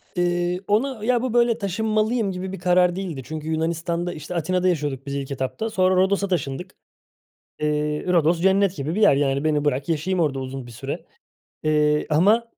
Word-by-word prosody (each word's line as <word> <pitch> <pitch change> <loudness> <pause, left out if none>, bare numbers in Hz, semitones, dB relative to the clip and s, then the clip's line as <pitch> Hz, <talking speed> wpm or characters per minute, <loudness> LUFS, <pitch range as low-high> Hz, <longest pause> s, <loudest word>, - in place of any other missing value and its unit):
İii, 175 +1 0
ona, 225 +2 0
ya, 245 -1 +2
bu, 255 -2 -2
böyle, 235 -1 +3
“taşınmalıyım” 215 +2 0
gibi 185 +1 -5
bir 195 - -6
karar 180 0 +3
değildi. 175 -8 -4
Çünkü 155 +3 -6
Yunanistan'da, 170 +2 -1
işte, 155 +3 -7
Atina'da 180 +3 0
yaşıyorduk 145 -6 -1
biz 140 - -4
ilk 140 0 -4
etapta. 135 - -3
Sonra 185 -2 +2
Rodos'a 195 +2 +2
taşındık. 180 0 -3 0.8
Eee, 150 0 -1
Rodos 170 -1 +3
cennet 195 0 +3
gibi 150 +4 -3
bir 215 - 0
yer, 145 - +6
yani 140 0 +1
beni 150 -1 +1
bırak, 140 +1 0
yaşayayım 175 +4 0
orada 145 -5 +1
uzun 130 0 -6
bir - - -11
süre, 115 - -6 0.6
eee, 150 -1 +2
ama, 205 +10 +4
175 Hz, 175 wpm, -23 LUFS, 150-195 Hz, 0.8 s, yer